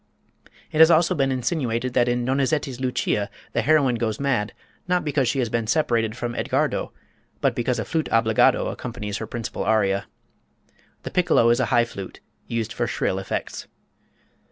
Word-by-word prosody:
It 155 Hz, -, -2 dB
has 160 Hz, 0 st, +9 dB
also 170 Hz, +2 st, +4 dB
been 135 Hz, -5 st, +1 dB
insinuated 125 Hz, -2 st, -1 dB
that 120 Hz, -1 st, +3 dB
in 120 Hz, 0 st, 0 dB
Donizetti's 135 Hz, 0 st, 0 dB
"Lucia" 125 Hz, -5 st, -1 dB, 0.2 s
the -, -, +1 dB
heroine 145 Hz, -6 st, +3 dB
goes 110 Hz, -2 st, -2 dB
mad, 135 Hz, -7 st, 0 dB, 0.4 s
not 180 Hz, -1 st, +1 dB
because 140 Hz, -3 st, +1 dB
she 140 Hz, -, 0 dB
has 125 Hz, -3 st, +1 dB
been 115 Hz, -1 st, -1 dB
separated 115 Hz, -5 st, +1 dB
from 120 Hz, -1 st, -3 dB
Edgardo, -, -, -1 dB, 0.5 s
but -, -, +1 dB
because 120 Hz, +1 st, -1 dB
a 110 Hz, -, -3 dB
flute 160 Hz, -1 st, -2 dB
obbligato 110 Hz, -1 st, +3 dB
accompanies 105 Hz, -3 st, -5 dB
her 110 Hz, -, -5 dB
principal 115 Hz, -2 st, -4 dB
aria. 100 Hz, -2 st, +1 dB, 1.0 s
The -, -, -6 dB
piccolo 145 Hz, -10 st, +3 dB
is 120 Hz, -, +2 dB
a 130 Hz, -, +1 dB
high 120 Hz, 0 st, +3 dB
flute 100 Hz, -5 st, -9 dB, 0.3 s
used 115 Hz, -2 st, -3 dB
for -, -, -1 dB
shrill 95 Hz, -, -1 dB
effects. 95 Hz, -, -5 dB
120 Hz, 165 wpm, -23 LUFS, 115-140 Hz, 1.0 s, has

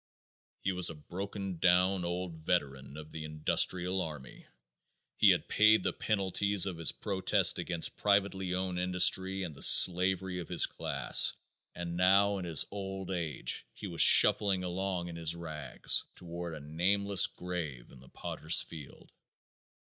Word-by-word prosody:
He 95 Hz, -, -1 dB
was 90 Hz, -1 st, 0 dB
a 80 Hz, -, -9 dB
broken 95 Hz, +3 st, -8 dB
down 90 Hz, +1 st, +1 dB
old 90 Hz, 0 st, -5 dB
veteran 70 Hz, -4 st, -4 dB
of 80 Hz, 0 st, -12 dB
the 80 Hz, -, -8 dB
industrial 90 Hz, +4 st, -1 dB
army. 75 Hz, -6 st, -10 dB, 0.7 s
He -, -, +5 dB
had -, -, +1 dB
paid 110 Hz, +1 st, +3 dB
the -, -, -2 dB
penalties 100 Hz, -1 st, 0 dB
of 95 Hz, -4 st, -6 dB
his 80 Hz, -, +4 dB
protest 95 Hz, -3 st, +1 dB
against 85 Hz, -2 st, -4 dB
privately 100 Hz, -2 st, -1 dB
owned 90 Hz, -1 st, -4 dB
industry 95 Hz, +1 st, +1 dB
and 85 Hz, -4 st, -7 dB
the 70 Hz, -, -15 dB
slavery 90 Hz, 0 st, +4 dB
of 85 Hz, -, -8 dB
his -, -, +3 dB
class, -, -, +2 dB, 0.4 s
and 85 Hz, -1 st, -6 dB
now 100 Hz, +2 st, +2 dB
in 90 Hz, -, -7 dB
his 80 Hz, -4 st, +2 dB
old 95 Hz, -1 st, -7 dB
age 85 Hz, -6 st, -4 dB
he -, -, -10 dB
was 85 Hz, -4 st, -2 dB
shuffling 95 Hz, -3 st, +5 dB
along 90 Hz, 0 st, -4 dB
in 85 Hz, -, -9 dB
his 85 Hz, 0 st, -2 dB
rags 80 Hz, -6 st, 0 dB
toward 85 Hz, -1 st, -8 dB
a -, -, -9 dB
nameless 95 Hz, +6 st, +1 dB
grave 80 Hz, -9 st, -8 dB
in 65 Hz, -, -16 dB
the 65 Hz, -, -18 dB
pottersfield. 80 Hz, -2 st, -2 dB
90 Hz, 150 wpm, -30 LUFS, 80-95 Hz, 0.7 s, He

